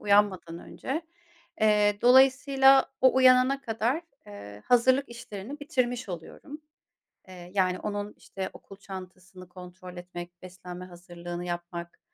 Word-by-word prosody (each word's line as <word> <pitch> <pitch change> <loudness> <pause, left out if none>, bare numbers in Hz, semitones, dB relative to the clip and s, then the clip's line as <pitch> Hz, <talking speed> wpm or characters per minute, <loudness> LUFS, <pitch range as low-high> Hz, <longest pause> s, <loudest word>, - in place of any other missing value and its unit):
uyanmadan 200 -5 +2
önce. 300 - -5 0.6
Eee, 210 -1 +3
dolayısıyla 270 +1 +5
o 260 0 +5
uyanana 260 +1 +5
kadar, 235 +7 -1 0.2
eee, 100 0 -11
hazırlık 260 +3 +3
işlerini 235 +3 -9
bitirmiş 255 - -1
oluyorum. 230 - -9 0.7
Eee, 180 -1 -12
yani, 185 -2 +1
onun 205 0 -4
işte 190 -1 -6
okul 195 - -13
çantasını 185 -1 -11
kontrol 180 0 -11
etmek, 175 0 -9
beslenme 180 0 -9
hazırlığını 175 -1 -8
yapmak, 175 0 -6
195 Hz, 115 wpm, -27 LUFS, 180-255 Hz, 0.7 s, dolayısıyla